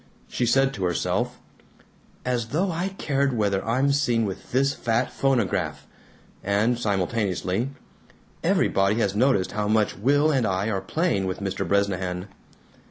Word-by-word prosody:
She 120 Hz, -, -1 dB
said 135 Hz, +2 st, +3 dB
to 95 Hz, -, -4 dB
herself, 90 Hz, -2 st, -1 dB, 0.9 s
"As 120 Hz, -2 st, -1 dB
though 175 Hz, +9 st, 0 dB
I 170 Hz, +3 st, -1 dB
cared 140 Hz, -2 st, 0 dB
whether 100 Hz, -3 st, +1 dB
I'm 130 Hz, +5 st, +1 dB
seen 120 Hz, -6 st, +2 dB
with 95 Hz, -2 st, -6 dB
this 135 Hz, +2 st, +2 dB
fat 120 Hz, 0 st, -1 dB
phonograph!" 130 Hz, -8 st, 0 dB, 0.6 s
and 105 Hz, +5 st, +1 dB
simultaneously, 100 Hz, +1 st, -1 dB, 0.7 s
"Everybody 100 Hz, +2 st, +2 dB
has 100 Hz, -4 st, 0 dB
noticed 110 Hz, -5 st, +2 dB
how 105 Hz, 0 st, -2 dB
much 110 Hz, 0 st, +2 dB
Will 145 Hz, -, +3 dB
and 130 Hz, -6 st, +1 dB
I 95 Hz, +3 st, 0 dB
are 95 Hz, -2 st, -1 dB
playing 100 Hz, -, 0 dB
with 95 Hz, -, -3 dB
Mr. 95 Hz, -1 st, -3 dB
Bresnahan." 95 Hz, -1 st, -1 dB
110 Hz, 140 wpm, -25 LUFS, 100-135 Hz, 0.9 s, said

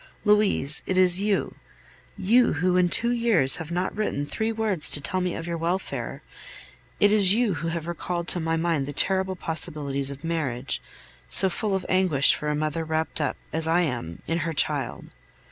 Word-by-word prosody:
Louise, 210 Hz, -9 st, +4 dB
it 185 Hz, -, -1 dB
is 185 Hz, 0 st, +5 dB
you 205 Hz, -1 st, -1 dB, 0.6 s
you, 235 Hz, +6 st, +3 dB
who 180 Hz, +4 st, 0 dB
in 180 Hz, -1 st, +3 dB
two 235 Hz, +6 st, +2 dB
years 230 Hz, -, +2 dB
have 160 Hz, -2 st, -7 dB
not 180 Hz, +3 st, -2 dB
written 200 Hz, -9 st, -2 dB
three 220 Hz, +9 st, -3 dB
words 215 Hz, -8 st, 0 dB
to -, -, +2 dB
tell 185 Hz, +6 st, -2 dB
me 180 Hz, -1 st, -2 dB
of 165 Hz, -, -6 dB
your 170 Hz, -1 st, -4 dB
welfare 175 Hz, +3 st, -4 dB, 0.8 s
it 205 Hz, -, +4 dB
is 200 Hz, -2 st, +6 dB
you 230 Hz, -4 st, +1 dB
who 165 Hz, 0 st, -5 dB
have 165 Hz, -1 st, -4 dB
recalled 170 Hz, 0 st, -4 dB
to 180 Hz, -, +2 dB
my 165 Hz, 0 st, -1 dB
mind 165 Hz, -4 st, -1 dB
the 145 Hz, -, -5 dB
terrible 190 Hz, +4 st, 0 dB
possibilities 145 Hz, -5 st, -2 dB
of 140 Hz, +2 st, -9 dB
marriage, 140 Hz, -7 st, -3 dB, 0.5 s
so 190 Hz, -, +5 dB
full 195 Hz, +3 st, -2 dB
of 190 Hz, -, -4 dB
anguish 180 Hz, -7 st, +3 dB
for 150 Hz, -, -4 dB
a 150 Hz, -, -1 dB
mother 155 Hz, +2 st, -2 dB
wrapped 160 Hz, 0 st, -3 dB
up, 150 Hz, -, -2 dB, 0.2 s
as 160 Hz, 0 st, +1 dB
I 170 Hz, +2 st, +2 dB
am, 120 Hz, -, -4 dB
in 165 Hz, +1 st, -2 dB
her 165 Hz, 0 st, -3 dB
child. 140 Hz, -, 0 dB
170 Hz, 190 wpm, -24 LUFS, 155-190 Hz, 0.8 s, is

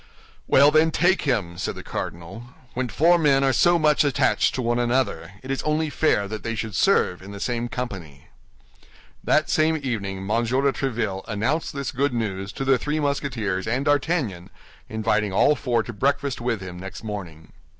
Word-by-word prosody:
"Well, 140 Hz, +2 st, +6 dB
then, 155 Hz, +1 st, +4 dB
take 180 Hz, +4 st, +2 dB
him," 90 Hz, -9 st, -1 dB
said -, -, -3 dB
the -, -, -9 dB
cardinal; 95 Hz, +9 st, -7 dB, 0.2 s
"when 125 Hz, 0 st, -2 dB
four 170 Hz, +6 st, +4 dB
men 140 Hz, -3 st, +3 dB
are 135 Hz, -1 st, +3 dB
so 175 Hz, +9 st, +4 dB
much 150 Hz, -2 st, +3 dB
attached 140 Hz, -1 st, +2 dB
to 130 Hz, -, -2 dB
one 120 Hz, +1 st, +1 dB
another, 120 Hz, -9 st, -1 dB
it 130 Hz, -, -5 dB
is 135 Hz, -, -1 dB
only 155 Hz, 0 st, 0 dB
fair 105 Hz, -11 st, +1 dB
that 110 Hz, 0 st, -6 dB
they 115 Hz, 0 st, -3 dB
should 110 Hz, -1 st, -4 dB
serve 90 Hz, -1 st, +2 dB
in 95 Hz, -, -11 dB
the 100 Hz, 0 st, -8 dB
same 120 Hz, +2 st, -2 dB
company." 90 Hz, -, -7 dB, 0.9 s
That -, -, +2 dB
same 160 Hz, +1 st, +2 dB
evening 100 Hz, -7 st, -3 dB
M. 95 Hz, -, -7 dB
de 105 Hz, -, -1 dB, 0.4 s
Tréville 110 Hz, -7 st, -2 dB
announced 115 Hz, +9 st, -1 dB
this 140 Hz, -1 st, -3 dB
good 140 Hz, 0 st, 0 dB
news 100 Hz, -3 st, -3 dB
to 135 Hz, -, -4 dB
the 135 Hz, -2 st, +3 dB
three 150 Hz, +4 st, -2 dB
Musketeers 125 Hz, -10 st, -2 dB
and 125 Hz, +5 st, -1 dB
D'Artagnan, 145 Hz, -, 0 dB, 0.4 s
inviting 110 Hz, -2 st, 0 dB
all 145 Hz, +9 st, +4 dB
four 120 Hz, -5 st, 0 dB
to 120 Hz, -, -7 dB
breakfast 140 Hz, +3 st, -1 dB
with 120 Hz, -4 st, -1 dB
him 90 Hz, -1 st, -8 dB
next 95 Hz, +4 st, -8 dB
morning. 85 Hz, -7 st, -7 dB
120 Hz, 180 wpm, -24 LUFS, 100-140 Hz, 0.9 s, Well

